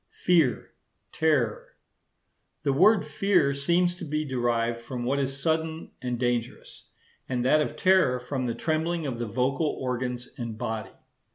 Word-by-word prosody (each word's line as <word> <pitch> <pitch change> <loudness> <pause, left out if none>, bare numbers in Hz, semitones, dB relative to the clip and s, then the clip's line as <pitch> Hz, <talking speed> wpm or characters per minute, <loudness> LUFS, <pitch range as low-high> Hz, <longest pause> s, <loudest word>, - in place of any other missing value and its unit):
Fear, 165 -9 +3 0.4
Terror.—The 140 0 -3
word 195 +5 +5
'fear' 155 -1 +2
seems 170 +6 +2
to 175 - -10
be 155 -1 -2
derived 120 -3 0
from 120 +1 -6
what 135 +3 0
is 135 0 -2
sudden 160 +2 -1
and 125 -1 -2
dangerous; 120 -1 -3 0.4
and 125 -1 -1
that 155 +4 +4
of 150 - -2
terror 185 -8 +3
from 130 0 -3
the 115 - -2
trembling 160 +4 -1
of 125 -4 -3
the 120 - -2
vocal 130 +7 0
organs 125 -1 -3
and 115 -2 -5
body. 110 0 -4
135 Hz, 145 wpm, -27 LUFS, 120-160 Hz, 0.4 s, word